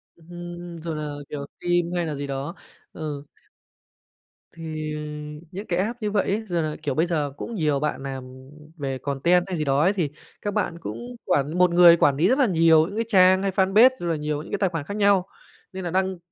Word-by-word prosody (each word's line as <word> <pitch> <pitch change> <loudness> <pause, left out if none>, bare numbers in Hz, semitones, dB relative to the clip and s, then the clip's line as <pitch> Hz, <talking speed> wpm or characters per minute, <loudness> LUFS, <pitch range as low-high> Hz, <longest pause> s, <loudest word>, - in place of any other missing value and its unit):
Ừm, 175 0 -9
rồi 165 -2 -4
là, 150 -1 -4 0.2
kiểu, 140 -1 -5 0.2
phim 175 -1 +1
hay 175 -1 0
là 150 -2 -3
gì 140 0 -5
đó, 140 +6 -4 0.4
ừ. 150 -3 -5 1.3
Thì 155 -2 -5 0.6
những 200 +4 -6
cái 175 0 0
app 230 +5 -2
như 210 -1 -1
vậy 205 - +2
ấy 220 +3 -2
giờ 175 -3 0
là 155 -1 -2
kiểu, 145 -4 -2
bây 165 +3 +2
giờ 150 -5 -1
cũng 235 - -6
nhiều 150 -5 +1
bạn 150 -2 -2
nàm 130 -1 -8 0.3
về 135 -2 -3
content 145 +7 +2
hay 185 -2 -3
gì 155 - -1
đó 140 +1 +2
ấy 190 +5 +3
thì 170 -7 -1 0.3
các 205 -1 -3
bạn 170 - -1
cũng 245 +8 -7
quản 150 -1 0
một 180 -1 +4
người 170 -1 +8
quản 140 -4 +3
lý 170 +5 +3
rất 265 +3 +3
là 265 - +5
nhiều 165 -3 +5
những 200 - -8
cái 230 0 -1
trang 185 -3 +5
hay 195 -1 0
fanpage, 195 +6 +5
rồi 175 - -3
là 165 - +1
nhiều 150 0 -2
những 155 - -11
cái - - 0
tài 195 - +2
khoản 165 -4 -4
khác 200 +6 -5
nhau, 200 -2 +3 0.5
nên 190 -1 -5
là 175 - -3
đăng 190 0 0
170 Hz, 225 wpm, -24 LUFS, 150-190 Hz, 1.3 s, người